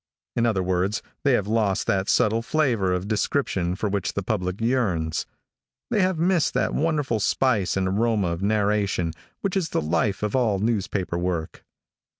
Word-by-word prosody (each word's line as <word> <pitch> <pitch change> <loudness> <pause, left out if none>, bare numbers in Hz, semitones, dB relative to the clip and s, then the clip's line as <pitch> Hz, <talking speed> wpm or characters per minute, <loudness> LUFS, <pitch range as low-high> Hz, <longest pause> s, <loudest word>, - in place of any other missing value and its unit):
In 120 0 +2
other 100 -5 +1
words, 95 +3 0 0.2
they 140 - +4
have 105 -5 +2
lost 105 -3 +1
that 95 0 0
subtle 110 +2 +3
flavor 115 -8 +1
of 90 +2 -1
description 100 -5 0
for 105 - -2
which 100 -2 -1
the 100 - -2
public 90 -2 -2
yearns. 105 -10 0 0.6
They 215 -4 +3
have 185 -2 +1
missed 170 0 +2
that - - +1
wonderful 150 -7 0
spice 105 -3 +1
and 95 -1 +1
aroma 105 -1 +1
of 85 +1 -3
narration 100 -4 +1 0.3
which 195 -2 -1
is 180 -5 0
the - - 0
life 85 +6 0
of 105 +2 -1
all 115 -6 +2
newspaper 100 -4 -1
work. 85 -3 -3
105 Hz, 165 wpm, -24 LUFS, 95-120 Hz, 0.6 s, they